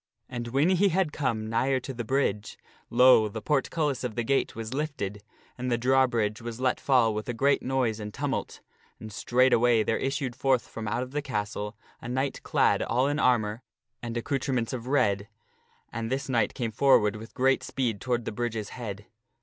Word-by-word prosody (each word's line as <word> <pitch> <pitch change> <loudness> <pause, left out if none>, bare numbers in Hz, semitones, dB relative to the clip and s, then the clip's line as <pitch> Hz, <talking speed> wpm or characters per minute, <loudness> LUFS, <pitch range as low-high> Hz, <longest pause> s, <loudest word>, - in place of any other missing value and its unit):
And 120 -2 -5
when 135 +8 +2
he 190 +2 +4
had 180 -3 0
come 115 -7 -1
nigher 130 +4 +1
to 135 - -6
the 120 -1 -4
bridge, 110 -4 -1 0.3
lo! 125 -4 +6
the 110 - -5
portcullis 145 +2 0
of 125 -3 -3
the 120 - -1
castle 135 -1 0
was 115 +1 -5
lifted 135 -9 -3 0.4
and 125 0 -2
the 120 - +2
drawbridge 120 -4 +2
was 115 0 -6
let 130 -1 +1
fall 125 -5 +3
with 110 +3 -4
a 120 - -2
great 140 +4 +2
noise 125 -4 0
and 105 -1 -6
tumult, - - -3 0.4
and 110 -1 -9
straightway 120 -1 +3
there 110 - 0
issued 135 -2 -2
forth 130 -1 +1
from 115 -1 -6
out 115 +4 -1
of 130 - -9
the 145 +1 -2
castle 105 -4 -4 0.2
a 120 - -7
knight 130 +2 -2
clad - - +2
all 125 +3 +1
in 145 +2 0
armor 115 -4 +2 0.4
and 120 0 -4
accoutrements 125 -1 -1
of 125 -1 -5
red, 105 -7 +1 0.7
and 115 0 -3
this 135 +1 -2
knight 115 -5 +1
came 115 -3 -2
forward 110 -4 +4
with 110 +1 -10
great 135 0 +3
speed 120 -7 -2
toward 120 -3 -1
the - - -3
bridge's 110 -2 -3
head. 105 -4 -7
120 Hz, 190 wpm, -27 LUFS, 110-135 Hz, 0.7 s, lo